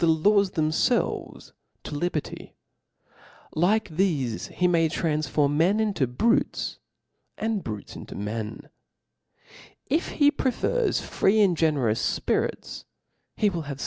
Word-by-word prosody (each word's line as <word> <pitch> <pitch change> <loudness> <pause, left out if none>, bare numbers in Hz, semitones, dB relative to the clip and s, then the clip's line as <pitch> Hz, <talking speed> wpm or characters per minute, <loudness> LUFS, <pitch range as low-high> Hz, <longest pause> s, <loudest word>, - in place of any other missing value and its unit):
^^ 160 -2 +3
^'^^ - - -12
^^^ 200 -1 +4
themfelv^ 155 -2 -1 0.3
to - - -7
liberty's 155 0 -3 1.0
like 205 +7 +2
thcfe 155 - -1
h« 180 - +4
may 165 -2 +3
transfer 150 -2 0
men 165 +8 +2
iftto 165 - -1
brutes, 230 - +1 0.6
arid' 220 -2 -1
brutes 105 -2 -7
into - - -9
men. 105 +1 -5 1.2
If 315 +6 -1
he 290 -1 +4
prefers 420 - 0
free 205 +3 +1
and 190 -4 +4
generous 140 -9 +1
fpirits, - - -2 0.5
he 210 -2 +2
Mriil 170 -4 -4
h^ve. 140 -1 -6
165 Hz, 120 wpm, -25 LUFS, 145-205 Hz, 1.2 s, ^^^